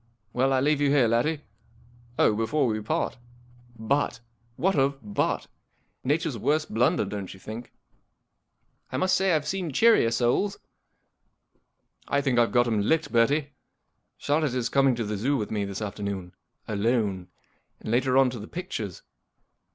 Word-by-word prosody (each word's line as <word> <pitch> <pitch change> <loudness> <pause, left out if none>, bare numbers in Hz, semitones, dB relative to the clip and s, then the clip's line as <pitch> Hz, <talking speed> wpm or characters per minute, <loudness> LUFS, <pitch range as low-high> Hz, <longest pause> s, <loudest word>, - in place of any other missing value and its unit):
Well, 130 +2 +2
I 130 -1 +2
leave 145 +1 +2
you 145 - +3
here, 140 -4 +4
laddie. 130 +7 +1 0.8
Oh, 105 - +4
before 130 +7 +1
we 110 -3 -1
part— 115 +3 -2 0.6
Butt! 115 +3 0 0.4
What 190 +7 +1
of 135 0 +2 0.2
Butt? - - 0 0.6
Nature's 150 -2 0
worst 150 +2 0
blunder, 115 -1 +2
don't 100 -1 -5
you - - -15
think? 110 +5 -8 0.3
" - - -51
" - - -46
1 130 - -2
must 185 +2 +3
say 190 0 +2
I've 155 -3 +1
seen 185 -4 -2
cheerier 220 - +5
souls." 120 - +1 0.8
" - - -41
I 140 - +1
think 135 -4 +1
I've 115 - +3
got 120 -1 +4
him 110 -3 +1
licked, 160 +10 +1
Bertie* 140 +6 +3 0.7
Charlotte 145 -3 0
is 125 -2 -1
coming 135 -2 +3
to 115 - -2
the 105 -1 -3
Zoo 135 +8 +1
with 105 -4 -4
me 105 -2 -1
this 100 +2 -5
afternoon. 100 -3 -5 0.3
Alone. 105 -3 0 0.5
And - - -5
later 130 +2 +2
on 135 -2 +5
to 120 - -6
the 105 - -8
pictures. 110 - -6
125 Hz, 165 wpm, -26 LUFS, 110-145 Hz, 0.8 s, cheerier